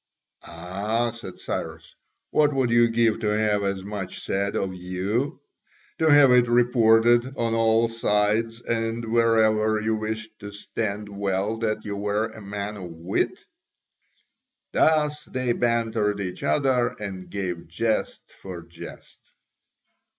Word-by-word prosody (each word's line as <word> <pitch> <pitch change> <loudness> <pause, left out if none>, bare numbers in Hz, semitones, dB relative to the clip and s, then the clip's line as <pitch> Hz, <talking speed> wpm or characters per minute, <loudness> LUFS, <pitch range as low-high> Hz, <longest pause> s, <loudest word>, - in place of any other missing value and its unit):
"Ah," 100 +8 -2
said 115 -5 -10
Cyrus, - - -5 0.4
"what 150 -2 +3
would 130 -3 +1
you 120 0 +5
give 115 -1 +2
to 105 - -2
have 105 -1 +1
as 100 -1 -2
much 100 -2 -6
said 100 +1 -1
of 95 -1 -1
you? 95 +8 -2 0.6
To 160 - +3
have 145 -3 +7
it 125 -1 +5
reported 120 +1 +4
on 115 -1 0
all 115 0 +3
sides 115 +1 0
and 115 0 -2
wherever 110 -1 +3
you 110 +1 0
wished 110 0 -5
to 105 -1 -8
stand 105 0 -4
well 100 +1 -2
that 110 -1 -2
you 100 -1 -3
were 105 +2 0
a 110 -1 -9
man 100 +1 -5
of 90 -3 -7
wit?" 85 +3 -2 1.3
Thus 150 -1 +2
they 130 -1 -2
bantered 115 -4 0
each 90 -2 -5
other 130 -4 +1
and 95 -3 -6
gave 90 -3 -4
jest 110 +6 -1 0.2
for 90 -3 -7
jest. 85 0 -12
110 Hz, 135 wpm, -25 LUFS, 100-115 Hz, 1.3 s, have